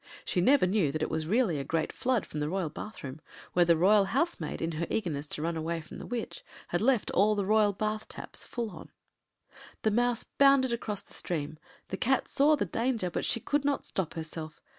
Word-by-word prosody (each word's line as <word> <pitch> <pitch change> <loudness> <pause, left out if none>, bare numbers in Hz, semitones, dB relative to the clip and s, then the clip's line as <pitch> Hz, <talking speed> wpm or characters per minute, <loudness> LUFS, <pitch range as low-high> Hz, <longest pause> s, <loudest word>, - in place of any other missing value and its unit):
She 180 - +1
never 260 +2 +5
knew 185 -6 +2
that 155 +2 -2
it - - -2
was 160 0 -1
really 200 - +2
a - - -2
great 160 +3 -1
flood 250 -4 0
from 150 - -6
the 150 0 -1
royal 185 -2 -1
bathroom, 150 -5 -8 0.3
where 175 -1 +5
the 170 -1 +4
royal 200 +4 +5
housemaid, 265 - -1
in 165 - -1
her 165 +1 -3
eagerness 155 -8 -2
to 150 - -4
run 165 0 -1
away 165 +1 -2
from 155 - -10
the - - -8
witch, 245 - -4 0.3
had - - 0
left 245 -1 +2
all 210 +3 +4
the 200 -2 0
royal 215 0 +4
bath 215 +2 -3
taps - - -8
full 235 -3 -4
on. - - -11 0.9
The 220 - +3
Mouse 240 +1 +1
bounded 275 -3 +4
across 210 -4 -3
the - - -18
stream—the 155 - -5
Cat 265 +2 +1
saw 295 +3 +4
the - - -1
danger, 230 -6 -1
but - - -2
she - - +1
could 290 +5 0
not 285 0 0
stop 185 -5 -3
herself. 160 -1 -6
200 Hz, 210 wpm, -30 LUFS, 160-240 Hz, 0.9 s, never